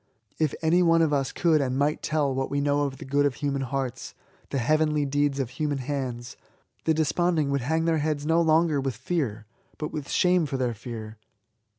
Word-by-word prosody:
If 155 -3 +1
any 170 +3 +4
one 165 -1 +4
of 155 -2 +1
us 135 -2 0
could 160 -3 +2
and 130 -1 -1
might 145 +2 +1
tell 150 -3 0
what 135 0 -2
we 140 - -1
know 145 0 +1
of 135 -1 -4
the - - -9
good 140 +2 +2
of 140 -3 +1
human 140 -1 -2
hearts, 135 -1 -4 0.3
the - - -2
heavenly 150 +3 +2
deeds 145 0 0
of 130 -3 -2
human 145 +1 -2
hands, 130 -3 -4 0.5
the 160 - +3
desponding 160 -1 +1
would 140 -1 0
hang 160 +6 0
their 165 -1 +2
heads 150 -1 -1
no 165 +2 +3
longer 160 -2 +3
with 135 -3 -2
fear, 125 -5 -2 0.3
but 150 - -4
with 150 -3 -5
shame 180 -3 +3
for 135 - -3
their 125 -2 0
fear. 110 -1 -8
145 Hz, 205 wpm, -26 LUFS, 135-155 Hz, 0.5 s, any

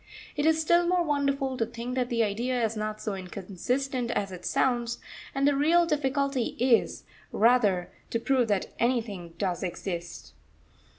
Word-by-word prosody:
It 295 +1 +1
is 320 0 +4
still 345 +2 +3
more 360 0 +3
wonderful 275 -3 0
to 225 - +1
think 235 +1 -5
that 250 -1 0
the 230 -1 +2
idea 235 +3 0
is 225 0 -2
not 215 0 -3
so 210 - -3
inconsistent 210 +8 -3
as 200 -4 -1
it 180 -1 -9
sounds, 240 -2 +1 0.4
and 275 +1 +2
the 290 - +3
real 330 +5 +4
difficulty 275 -4 0
is, 245 -1 +2 0.3
rather, 210 -6 +3 0.2
to 230 - -1
prove 255 0 +2
that 205 -3 0
anything 215 -9 -1
does 180 -3 -1
exist. 175 -1 -5
240 Hz, 160 wpm, -28 LUFS, 205-275 Hz, 0.4 s, is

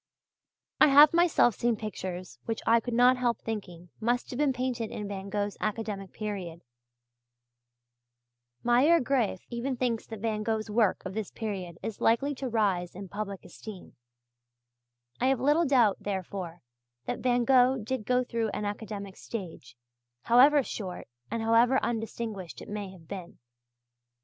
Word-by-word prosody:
I - - +8
have 290 +2 +8
myself 335 -8 +4
seen 235 +2 +1
pictures 185 - -6
which 225 - -3
I 230 +1 +5
could 235 +1 -4
not 250 +1 +5
help 240 -2 +1
thinking 180 -6 -6
must 240 +2 0
have 250 - -5
been 295 -2 +3
painted 250 -3 -2
in 210 - -5
Van 200 -1 -6
Gogh's 205 0 -2
academic 210 -3 -3
period; 185 -6 -5 2.0
Meier 260 +8 +5
Graefe 245 - 0
even 245 +2 -2
thinks 240 -3 -1
that 220 -2 -7
Van 215 -1 -1
Gogh's 220 0 -2
work 215 -3 +2
of 190 - -5
this 215 -1 -3
period 190 -6 -5
is 220 - -5
likely 255 +6 +3
to 265 -1 -4
rise 195 -7 0
in 195 0 -8
public 200 -1 -5
esteem; 210 -5 -11 1.2
I 255 - +2
have 265 -2 +2
little 295 +6 +3
doubt, 240 -7 +4
therefore, 185 -4 -5 0.4
that - - -3
Van 245 -1 +2
Gogh 260 0 +5
did 240 +1 -3
go 250 0 +3
through 230 -2 -2
an 210 - -3
academic 205 -1 -5
stage, 170 - -8 0.5
however 275 +4 +6
short 190 -7 -6 0.2
or 230 - -1
however 230 +3 +4
undistinguished 225 -5 -4
it - - -10
may 205 -1 -4
have 180 -4 -15
been. 185 -2 -8
220 Hz, 150 wpm, -29 LUFS, 200-245 Hz, 2.0 s, I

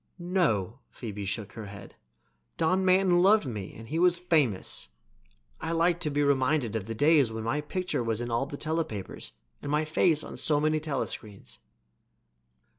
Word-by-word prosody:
"No," 150 - 0
Phoebe 105 -4 -6
shook 100 +1 -3
her 115 - -7
blonde 100 -1 -8
head. - - -13 0.6
"Don 185 +4 +2
Manton 185 -1 +4
loved 205 0 +5
me 105 -6 -6
and 115 +1 -10
he 160 +3 -1
was 175 0 +4
famous. 155 - +1 0.7
I 165 - -3
like 170 +1 +2
to 155 - -1
be 145 0 +1
reminded 135 -4 +1
of 110 -2 -3
the 115 - -4
days 145 -2 +4
when 110 0 -5
my 130 +7 0
picture 180 -3 -2
was 115 -1 -1
in 120 0 -4
all 120 +4 0
the 145 - -7
telepapers 155 - -3 0.3
and 145 - -4
my 150 +1 +2
face 155 0 +2
on - - -8
so 150 -2 +2
many 155 +1 +2
telescreens." 130 -8 -5
145 Hz, 175 wpm, -28 LUFS, 115-165 Hz, 0.7 s, loved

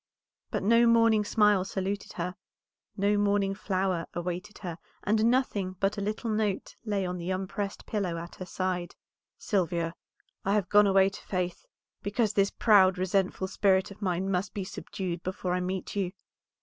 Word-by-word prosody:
But - - -2
no 230 +3 +5
morning 230 -2 +5
smile 210 -2 +3
saluted 195 +1 -3
her, 180 +1 -3 0.6
no 205 +1 +2
morning 200 -1 +2
flower 190 -3 -1
awaited 180 +4 -4
her, 170 -1 -5 0.2
and 215 +2 +2
nothing 230 -6 +1
but 195 +1 +1
a 205 - -4
little 215 +3 -2
note 215 -2 -1
lay 205 -4 -1
on 180 0 -3
the 170 +1 -4
unpressed 195 +2 -3
pillow 190 -6 -2
at 170 +1 -7
her 185 - -6
side. 180 -1 -2 0.4
"Sylvia, 170 -4 0 0.5
I 195 - +1
have 195 -4 0
gone 205 0 +6
away 195 0 +5
to 195 - -10
Faith, 180 - -3 0.3
because 210 +1 0
this 200 -1 +3
proud, 190 -4 +5
resentful 190 0 0
spirit 190 0 +2
of 200 - -12
mine 190 0 0
must 190 +2 -1
be 200 - -2
subdued 185 -2 -5
before 185 0 -3
I 180 - +1
meet 185 +2 -3
you. 190 -2 -1
195 Hz, 165 wpm, -29 LUFS, 185-205 Hz, 0.6 s, gone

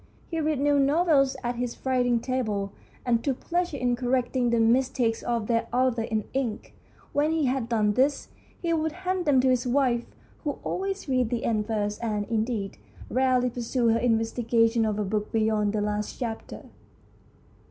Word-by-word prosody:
He 330 - -1
read 305 -2 0
new 285 0 +3
novels 280 -1 +3
at 240 0 -2
his 245 -1 -3
writing 245 -2 +2
table, 220 -6 -2 0.3
and 235 -2 +2
took 270 -3 -1
pleasure 345 -3 -1
in 245 -2 +1
correcting 250 0 0
the 235 0 +2
mis 245 +4 +3
takes 230 -3 0
of 235 -3 -1
their 230 +1 0
authors 245 -2 +1
in 220 -2 0
ink. 255 -5 -3 0.4
When 290 +2 +2
he 320 -2 +1
had 255 -2 -1
done 215 -3 +2
this, 275 +5 +1 0.3
he 335 -1 +1
would 320 -1 0
hand 370 -1 0
them 285 -3 +4
to 260 - +3
his 255 -1 +1
wife, 245 -2 +1 0.4
who 290 -3 -2
always 390 -1 -3
read 255 -4 +1
the 235 -1 -2
end 215 -2 0
first, 210 0 -2
and, 210 -2 -1
indeed, 220 -3 -2 0.3
rarely 255 -1 +2
pursued 240 0 0
her 230 - +2
investigation 230 0 +2
of 210 -1 -1
a 210 - 0
book 210 +1 -2
beyond 215 -2 +1
the 210 0 -1
last 210 0 -2
chapter. 230 -3 -5
245 Hz, 175 wpm, -26 LUFS, 225-265 Hz, 0.4 s, them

